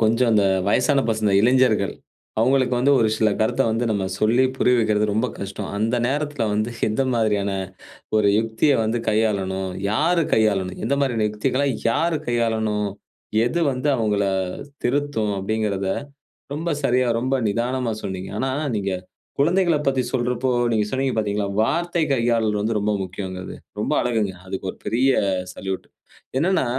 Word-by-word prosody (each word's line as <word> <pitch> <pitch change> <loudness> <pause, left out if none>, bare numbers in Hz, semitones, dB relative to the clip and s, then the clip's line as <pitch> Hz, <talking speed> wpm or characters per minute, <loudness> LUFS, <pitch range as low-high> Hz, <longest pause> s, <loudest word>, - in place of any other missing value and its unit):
கொஞ்சம் 115 +2 +3
இந்த 100 -2 +4 0.2
வயசான 140 +6 +3
பசங்க 110 -2 +1
இளைஞர்கள் 120 -3 +3 0.5
அவங்களுக்கு 130 +1 +3
வந்து 140 +3 +3
ஒரு 110 - +3
சில 110 0 +3
கருத்தை 110 +5 +2
வந்து 115 +2 0
நம்ம 100 -3 0
சொல்லி 120 +4 +3
புரிய 125 - +3
வைக்கிறது 105 -2 +2
ரொம்ப 110 +4 +1
கஷ்டம். 100 0 -5
அந்த 115 +4 +1
நேரத்தில 145 -2 -1
வந்து 110 +3 0 0.2
எந்த 110 +5 0
மாதிரியான 105 -3 +1 0.7
ஒரு 105 -1 +4
யுக்தியை 115 +6 +2
வந்து 115 +2 0
கையாளனும், 95 -3 0 0.2
யாரு 165 +9 +2
கையாளனும், 100 -4 +1
எந்த 135 +5 +1
மாரியான 120 -6 +1
யுக்திகளை 130 +6 0 0.2
யார் 165 +7 +1
கையாளணும்? 110 -3 0 0.6
எது 170 +8 0
வந்து 130 +3 -2
அவங்களை 105 -3 +1 0.5
திருத்தும் 125 -5 0
அப்படிங்கிறதை 100 -1 -1 0.6
ரொம்ப 165 +4 -3
சரியா 125 0 +2
ரொம்ப 130 +2 0
நிதானமா 120 +2 -1
சொன்னீங்க. 95 -1 -5
ஆனா 135 - 0 0.3
நீங்க 100 -2 -1 0.5
குழந்தைகளைப் 165 -1 +2
பத்தி 130 -1 +2
சொல்றப்போ 125 0 0 0.2
நீங்க 105 -2 +2
சொன்னீங்க 130 -1 0
பார்த்தீங்களா, 105 -2 0
வார்த்தை 170 +6 0
கையாளல் 115 -4 +1
வந்து 110 +1 0
ரொம்ப 105 +1 0
முக்கியம் 95 0 -6
அது. - - -8 0.2
ரொம்ப - - 0
அழகுங்க. 110 -6 0
அதுக்கு 95 0 -5
ஒரு - - -18
பெரிய 125 +5 +2 0.4
சல்யூட். 95 0 -5 0.5
என்னன்னா, 180 0 +2
115 Hz, 145 wpm, -22 LUFS, 105-130 Hz, 0.7 s, இந்த